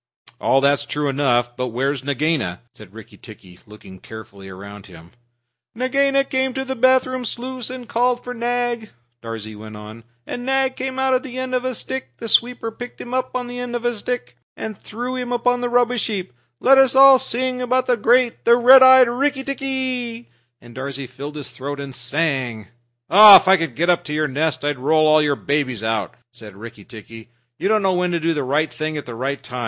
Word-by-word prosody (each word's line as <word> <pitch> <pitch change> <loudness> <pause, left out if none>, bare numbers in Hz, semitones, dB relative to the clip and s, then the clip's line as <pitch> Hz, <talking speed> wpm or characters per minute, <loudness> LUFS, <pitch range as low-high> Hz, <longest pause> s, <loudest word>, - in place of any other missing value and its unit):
"All 135 - +2
that's 140 +1 +2
true 145 0 -3
enough. 120 -3 0
But 125 0 -3
where's 130 +3 -2
Nagaina?" 145 - -2
said 105 -3 -15
Rikki 110 0 -14
tikki, 95 -5 -15
looking 105 -3 -14
carefully 100 -3 -12
round 100 +2 -11
him. 85 -2 -15 0.6
"Nagaina 275 +3 +1
came 260 -1 -2
to 265 0 -3
the 265 0 -4
bathroom 255 +1 +2
sluice 250 +1 -5
and 255 -2 -8
called 245 +1 0
for 250 - -6
Nag," 240 -1 -2 0.3
Darzee 110 -2 -7
went 110 0 -10
on, 110 +2 -11 0.2
"and 245 - -6
Nag 265 0 0
came 260 0 -5
out 265 0 +1
on 255 - +2
the 255 -2 -9
end 255 0 -4
of 250 0 0
a 255 -1 -3
stick 130 - -6
the 230 - -7
sweeper 235 0 +1
picked 245 +2 -10
him 245 - -8
up 255 0 -2
on 250 -1 -2
the 245 0 -7
end 245 -1 -5
of 240 0 -4
a 240 - +1
stick 210 - -5 0.2
and 220 -1 -6
threw 245 +6 -6
him 250 -1 -5
upon 245 0 0
the 245 - -2
rubbish 245 -1 +1
heap. 190 - -5 0.3
Let 270 +1 +5
us 265 -1 +4 0.3
sing 255 0 -2
about 255 +1 0
the 250 - +2
great, 240 +2 +1
the 235 - +5
red 255 +2 +7
eyed 260 -1 +8
Rikki 270 +3 -1
tikki!" 260 -3 -4 0.3
And 120 0 -16
Darzee 135 +1 -6
filled 140 +4 -9
his 145 -2 -7
throat 140 +2 -7
and 140 -2 -7
sang. 125 -4 -2 0.4
"If 205 0 +9
I 190 - +7
could 165 -9 -3
get 170 +4 +2
up 175 - 0
to 150 - -5
your 155 0 0
nest, 145 0 -2
I'd 145 -3 -2
roll 155 +2 +3
your 145 -1 +1
babies 135 -6 -2
out!" 110 -1 -2 0.2
said 110 -5 -12
Rikki 105 -1 -12
tikki. 115 0 -12 0.3
"You - - -1
don't 215 0 +2
know 190 -1 +2
when 180 0 0
to 170 - 0
do 165 +1 0
the 150 - -2
right 145 +5 -1
thing 155 0 -4
at 145 - -6
the 120 - -8
right 135 +4 -4
time. 125 0 -7
175 Hz, 205 wpm, -20 LUFS, -, 0.6 s, If